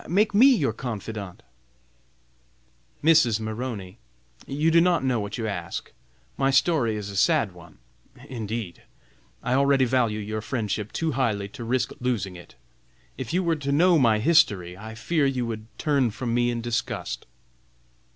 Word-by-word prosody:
make 205 +5 +2
me 230 +7 +7
your 155 - +3
confidante." 110 -5 -6 1.6
"Mrs. 150 -9 +5
Maroney, 110 -4 -5 0.5
you 150 +4 +1
do 165 +1 +6
not 175 -4 +2
know 130 -3 +1
what 100 +2 -4
you 115 - -3
ask! 90 -5 -5 0.5
My 135 - +2
story 135 -4 +2
is 105 -1 -5
a - - -9
sad 140 - +3
one, 85 -2 -16 0.5
indeed. 110 -5 -5 0.6
I 125 - 0
already 140 0 +4
value 120 -4 +1
your 110 +1 -4
friendship 105 -3 -3
too 160 -1 -1
highly 110 -7 0
to 120 +3 -9
risk 125 +2 0
losing 110 -7 -2
it. 85 -7 -13 0.6
If 130 -3 -6
you 185 +2 +1
were 165 -2 +1
to 140 -1 -3
know 170 +3 +4
my 115 -5 +4
history, 105 - +3
I 110 +3 -9
fear 145 +6 +1
you 130 -3 -1
would 110 -1 -5
turn 140 -5 +2
from 115 +2 -4
me 120 0 +2
in 120 -1 -2
disgust." 115 - -3
120 Hz, 155 wpm, -25 LUFS, 105-140 Hz, 1.6 s, me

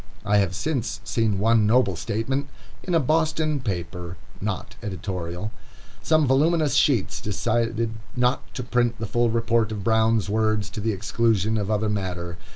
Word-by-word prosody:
I 105 0 +3
have 95 -3 +1
since 125 -1 -2
seen 110 -4 0
one 110 +1 +3
noble 110 -4 +3
statement, 115 +10 -2 0.3
in 180 - -1
a - - +5
Boston 155 +1 +1
paper, 90 -5 -4 0.2
not 100 -1 -4
editorial. 95 -1 -4 0.5
Some 155 -1 +3
voluminous 150 +3 +3
sheets 125 -9 +2
decided 115 +2 0 0.2
not 125 +1 0
to 125 - -3
print 120 -1 +1
the 110 - -4
full 120 +2 +1
report 115 -1 +1
of 105 -2 -4
Brown's 110 0 +2
words 110 -1 0
to 105 - -5
the 110 +2 0
exclusion 110 +1 +1
of 105 -2 -1
other 110 0 +1
matter. 90 -4 -3
110 Hz, 155 wpm, -24 LUFS, 100-125 Hz, 0.5 s, a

